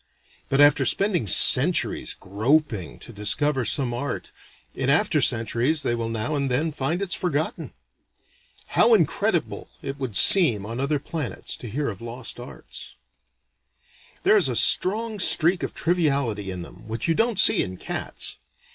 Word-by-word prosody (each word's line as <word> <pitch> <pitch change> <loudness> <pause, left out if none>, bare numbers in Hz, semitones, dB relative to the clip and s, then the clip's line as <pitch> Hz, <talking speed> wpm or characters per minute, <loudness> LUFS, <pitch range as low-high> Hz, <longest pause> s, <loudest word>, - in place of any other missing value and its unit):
But 135 - 0
after 145 -1 +5
spending 175 - 0
centuries - - +4
groping 110 - -1
to 120 - -11
discover 130 +6 +1
some 125 -1 0
art, 140 +4 -5 0.4
in - - -3
after - - +2
centuries 120 +7 0
they 120 - -1
will 115 -1 -3
now 115 +6 -3
and 140 -2 -1
then 145 +6 -1
find 155 +6 -2
it's 180 -3 -2
forgotten. 160 -3 -3 1.0
How 470 - +4
incredible - - -1
it 135 +1 -6
would 130 -6 -5
seem 125 - +4
on 115 +3 -6
other 140 +2 -1
planets 150 -1 -4
to 120 - -9
hear 140 +7 -3
of 100 -2 -9
lost 120 +1 -7
arts. 120 - -10 1.3
"There - - +4
is - - +2
a - - -3
strong 215 +2 +2
streak 170 0 +4
of - - -5
triviality 140 - -1
in 90 -2 -6
them, 90 +5 -15
which 110 +6 -4
you 165 - +2
don't 225 +2 0
see - - +6
in 95 0 -5
cats. - - -4
135 Hz, 155 wpm, -23 LUFS, 115-160 Hz, 1.3 s, see